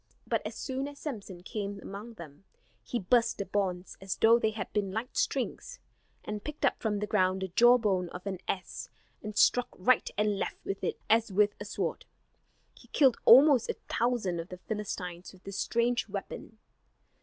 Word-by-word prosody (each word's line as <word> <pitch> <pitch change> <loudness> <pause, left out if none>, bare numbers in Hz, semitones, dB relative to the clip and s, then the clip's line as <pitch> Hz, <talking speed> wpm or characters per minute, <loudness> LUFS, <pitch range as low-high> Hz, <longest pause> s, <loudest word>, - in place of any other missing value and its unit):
But - - 0
as - - -8
soon 265 +1 -3
as 290 0 -10
Samson 205 - -7
came 200 -1 -4
among 210 +5 -8
them, 155 -3 -12 0.4
he 245 - -3
burst 235 +3 +2
the 200 - -3
bonds 185 -2 -2
as 195 0 -3
though 230 +1 +5
they 220 - +2
had 215 -3 -6
been 200 -2 0
light 225 +6 -4
strings; - - -2 0.5
and 210 -1 -5
picked 300 0 -3
up - - +1
from 215 -2 -1
the 210 - -2
ground 190 -2 +1
the 190 - -3
jawbone 210 -4 +4
of 180 +2 -9
an 190 -3 -3
ass, 185 - -4 0.3
and 210 0 -7
struck 245 +2 +4
right 230 +6 +3
and 210 -1 +1
left - - -3
with 195 - -4
it - - -2
as 225 -1 +3
with 205 +2 +3
a 205 - -6
sword. 205 - -3 0.7
He - - -18
killed 265 -5 +4
almost 260 0 +7
a - - -2
thousand 230 -8 0
of 165 - -6
the 180 - -7
Philistines 180 -3 -5
with 185 -1 -18
this 195 0 -6
strange 235 -1 0
weapon. 205 +2 -7
210 Hz, 185 wpm, -30 LUFS, 190-235 Hz, 0.7 s, almost